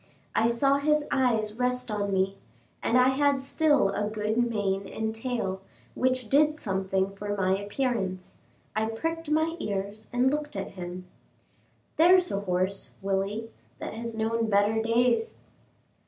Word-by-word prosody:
I 225 - +3
saw 275 +4 +3
his 300 +1 +2
eye 250 -4 +3 0.2
rest 250 -1 0
on 205 -1 -1
me; 190 0 +1 0.5
I 250 +2 +4
had 280 +1 +2
still 290 -6 +3
a 205 +1 -1
good 215 0 -2
mane 205 -5 0
and 220 +2 -3
tail, 225 -5 -3 0.3
which 255 -2 0
did 300 +4 +3
something 190 0 -1
for 205 +1 -3
my 190 0 +2
appearance. 200 -3 -2 0.4
I 220 0 +1
pricked 325 +8 -3
my 315 +2 +1
ears 200 -1 -4
and 250 +2 +3
looked 295 -2 -3
at 195 - -3
him. 180 0 -7 0.9
"There's 360 +2 +5
a 200 - 0
horse, 190 0 -1
Willie, 200 +3 -1 0.3
that - - -6
has 230 0 -5
known 225 0 0
better 205 +2 +3
days." 240 - +2
225 Hz, 140 wpm, -27 LUFS, 195-260 Hz, 0.9 s, There's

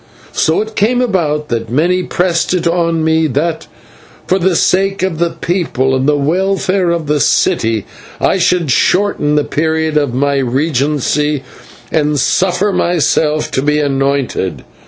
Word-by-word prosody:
So 160 +4 +1
it 220 0 -6
came 235 +5 +2
about 160 -11 -1
that 115 -2 -3
many 170 +9 +1
pressed 175 0 0
it 175 - -2
on 170 -1 +1
me 160 0 +2
that 160 +4 -2 0.6
for 190 - +1
the 185 0 +1
sake 195 +3 +1
of 180 -4 -1
the 170 0 +1
people 160 -8 -1
and 130 +1 0
the 150 - +2
welfare 185 +4 0
of 170 -2 -1
the 150 0 0
city, 115 -4 +1 0.3
I 190 - +1
should 170 -4 +1
shorten 180 -2 +1
the 150 - +2
period 160 0 -1
of 145 -4 +1
my 140 +1 +1
regency 145 +2 0 0.5
and 150 -2 +1
suffer 185 +8 +1
myself 155 -3 +1
to 130 - 0
be 150 +1 +1
anointed. 135 - -1
160 Hz, 150 wpm, -14 LUFS, 145-180 Hz, 0.6 s, came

